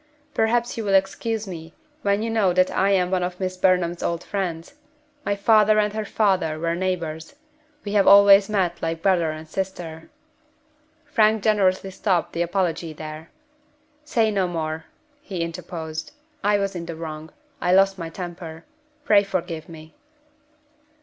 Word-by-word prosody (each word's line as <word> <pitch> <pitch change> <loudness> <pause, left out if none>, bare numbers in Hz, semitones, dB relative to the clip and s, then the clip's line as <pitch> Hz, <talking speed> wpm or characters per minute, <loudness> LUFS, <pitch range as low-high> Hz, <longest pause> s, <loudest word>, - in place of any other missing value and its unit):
"Perhaps 235 +2 +1
you - - -2
will 200 -2 +2
excuse 210 +3 0
me 165 -2 -8 0.3
when 200 -1 +1
you 230 - -2
know 205 -5 +2
that 185 +1 +3
I 195 - +2
am 185 -2 +2
one 185 -1 +1
of 180 0 -3
Miss 185 -1 -2
Burnham's 180 -2 +1
old 170 0 -2
friends. 180 -1 -4 0.5
My 205 - 0
father 215 +1 +4
and 210 -1 +2
her 215 0 -3
father 185 -8 +1
were 165 +1 -1
neighbors. 170 - -3 0.5
We 205 - -5
have 200 -2 +3
always 200 0 +8
met 185 -5 0
like 165 0 -3
brother 180 -4 +3
and 155 +1 -7
sister 170 -3 -5 0.5
" 310 +1 -39
Frank 215 -2 +3
generously 195 -3 +2
stopped 185 -2 0
the 170 - -2
apology 175 -2 -1
there. 155 +1 -8 0.7
"Say 225 -7 +1
no 195 -3 +1
more," 160 -2 -4 0.4
he 190 - -5
interposed. 165 - -5 0.3
"I 205 0 +3
was 195 -1 -2
in 170 -1 -5
the 165 - -5
wrong 160 -1 -7 0.3
I 180 - +1
lost 195 +1 +4
my 165 -1 -5
temper. 170 -2 -8 0.4
Pray 205 -1 +6
forgive 175 -4 -4
me." 160 -1 -12
185 Hz, 160 wpm, -23 LUFS, 165-200 Hz, 0.7 s, always